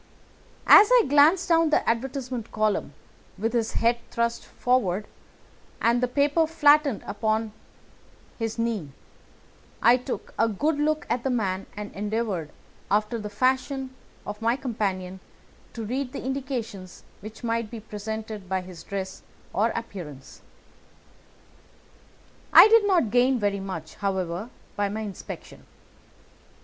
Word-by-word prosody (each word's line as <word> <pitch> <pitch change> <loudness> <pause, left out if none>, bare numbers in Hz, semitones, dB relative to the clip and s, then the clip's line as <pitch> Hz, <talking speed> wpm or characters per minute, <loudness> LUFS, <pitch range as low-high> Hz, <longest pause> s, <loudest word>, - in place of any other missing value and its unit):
As 415 - +9
he - - +6
glanced 300 +7 +5
down 330 -2 +4
the 300 - +1
advertisement 250 0 -2
column, 215 -1 -1 0.4
with 225 +4 -1
his 230 -2 0
head 235 +1 +2
thrust 235 0 -1
forward 215 -6 0 0.7
and 235 +1 +2
the 250 - +2
paper 290 +5 +2
flattened 295 -5 +4
out - - -10
upon 220 0 0 0.9
his 225 0 -3
knee, 230 -9 -2 0.9
I 240 +2 +6
took 255 +1 -6
a 225 - +4
good 290 +9 0
look 305 0 0
at 245 - -1
the 270 - 0
man 195 -6 -1
and 210 0 -6
endeavoured, 205 -6 -2 0.4
after 210 +3 +1
the 210 -1 -5
fashion 260 +4 0 0.3
of 205 +1 -6
my 230 +2 +2
companion, 195 -8 -3 0.5
to 225 -2 -5
read 255 +3 -3
the - - -6
indications 250 -9 -5 0.2
which 215 +4 -11
might 230 -1 -1
be 230 - -7
presented 215 -1 -6
by 190 -1 0
his 180 -2 -11
dress 190 -1 -5 0.3
or 220 +4 +2
appearance. 170 -12 -8 2.1
I - - +10
did 445 -2 +5
not 345 - +2
gain 250 +2 +3
very 205 -3 0
much, 165 -5 -6
however, 190 +1 -3 0.3
by 205 0 0
my 215 +2 -4
inspection. 205 -3 -8
225 Hz, 135 wpm, -25 LUFS, 205-260 Hz, 2.1 s, I